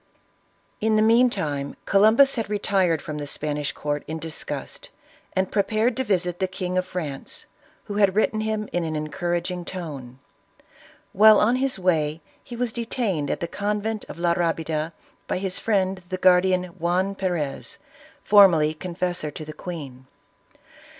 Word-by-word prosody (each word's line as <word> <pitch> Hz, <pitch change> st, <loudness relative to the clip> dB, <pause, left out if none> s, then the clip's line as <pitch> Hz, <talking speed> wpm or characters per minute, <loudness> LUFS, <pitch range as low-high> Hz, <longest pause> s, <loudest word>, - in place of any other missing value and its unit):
In 220 Hz, 0 st, +2 dB
the 215 Hz, -, +4 dB
meantime, 195 Hz, -, +2 dB
Columbus 220 Hz, +8 st, +5 dB
had 225 Hz, -4 st, -3 dB
retired 195 Hz, -6 st, +1 dB
from 150 Hz, -1 st, -5 dB
the 145 Hz, -, -5 dB
Spanish 145 Hz, 0 st, -2 dB
court 145 Hz, 0 st, -3 dB
in 160 Hz, +2 st, -4 dB
disgust, 160 Hz, 0 st, -7 dB, 0.4 s
and 190 Hz, 0 st, 0 dB
prepared 215 Hz, +3 st, +1 dB
to 260 Hz, -, -1 dB
visit 180 Hz, -5 st, -1 dB
the 190 Hz, -, +1 dB
King 185 Hz, -1 st, -4 dB
of 185 Hz, 0 st, 0 dB
France, 150 Hz, -7 st, -3 dB, 0.4 s
who 205 Hz, -, -5 dB
had 200 Hz, -2 st, +3 dB
written 215 Hz, 0 st, +2 dB
him 215 Hz, -1 st, -2 dB
in 175 Hz, -, 0 dB
an 160 Hz, -1 st, -3 dB
encourag 175 Hz, +4 st, -2 dB
ing 180 Hz, -1 st, -5 dB
tone. 145 Hz, -9 st, -7 dB, 1.0 s
While 215 Hz, +2 st, +7 dB
on 235 Hz, +4 st, +3 dB
his 265 Hz, -2 st, -1 dB
way 160 Hz, -4 st, +1 dB, 0.2 s
he 240 Hz, -, -9 dB
was 240 Hz, -1 st, -2 dB
detaine^ 225 Hz, -, -2 dB
at -, -, -2 dB
the 170 Hz, -, -1 dB
convent 210 Hz, +3 st, -2 dB
of -, -, -8 dB
La 170 Hz, 0 st, +2 dB
Rabida, 165 Hz, -2 st, -1 dB, 0.4 s
by -, -, -1 dB
his 185 Hz, -1 st, -2 dB
friend 190 Hz, -3 st, 0 dB
the 185 Hz, -, -2 dB
guardian, 185 Hz, 0 st, +4 dB
Juan 180 Hz, +2 st, -1 dB
Perez, 175 Hz, -8 st, -3 dB, 0.5 s
formerly 175 Hz, -7 st, +6 dB
confessor 175 Hz, -1 st, -3 dB
to 155 Hz, +1 st, -8 dB
the 155 Hz, -, -8 dB
queen. 140 Hz, -7 st, -8 dB
180 Hz, 155 wpm, -24 LUFS, 160-210 Hz, 1.0 s, While